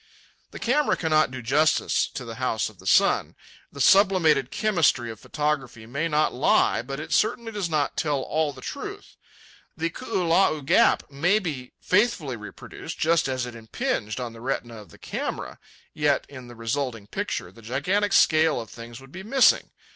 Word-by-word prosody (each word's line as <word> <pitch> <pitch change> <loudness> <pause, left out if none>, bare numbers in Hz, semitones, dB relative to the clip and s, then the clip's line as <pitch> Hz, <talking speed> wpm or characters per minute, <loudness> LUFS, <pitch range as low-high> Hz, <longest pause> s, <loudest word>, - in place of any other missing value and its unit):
The - - -10
camera 285 +5 +1
cannot 155 -3 +2
do 130 -1 -7
justice 150 +6 +2
to 125 - -5
the 115 +2 -8
House 120 -4 0
of - - -20
the - - -11
Sun. - - +3 0.4
The 140 - -11
sublimated 165 -6 +4
chemistry 155 - +1
of 110 - -11
photography 140 -7 -3
may 140 +8 -2
not 155 -1 +1
lie, 125 -2 +3
but 135 +3 -6
it 155 - -5
certainly 225 +1 +1
does 205 -5 -3
not 150 -3 -1
tell 145 -3 0
all 155 -1 0
the 130 -2 -13
truth. 405 - -7 0.6
The 165 +1 -1
Koolau 180 - +1
Gap 140 - +3
may 175 +9 +2
be 150 -11 -5
faithfully 185 - +1
reproduced, 105 -1 -9
just 165 0 +2
as 130 -1 -2
it 120 - -8
impinged 115 - -3
on 120 -2 -5
the 115 - -12
retina 120 -2 -3
of 105 -2 -12
the - - -16
camera, - - -5 0.3
yet 150 -3 +1
in 130 -3 -11
the 120 - -11
resulting 115 -1 -3
picture 90 -3 -4
the 115 - -16
gigantic 180 - 0
scale 160 -5 +4
of 115 -2 -8
things 115 0 -10
would 135 0 -15
be 185 - -8
missing. 250 +6 +3
145 Hz, 175 wpm, -25 LUFS, 125-175 Hz, 0.6 s, sublimated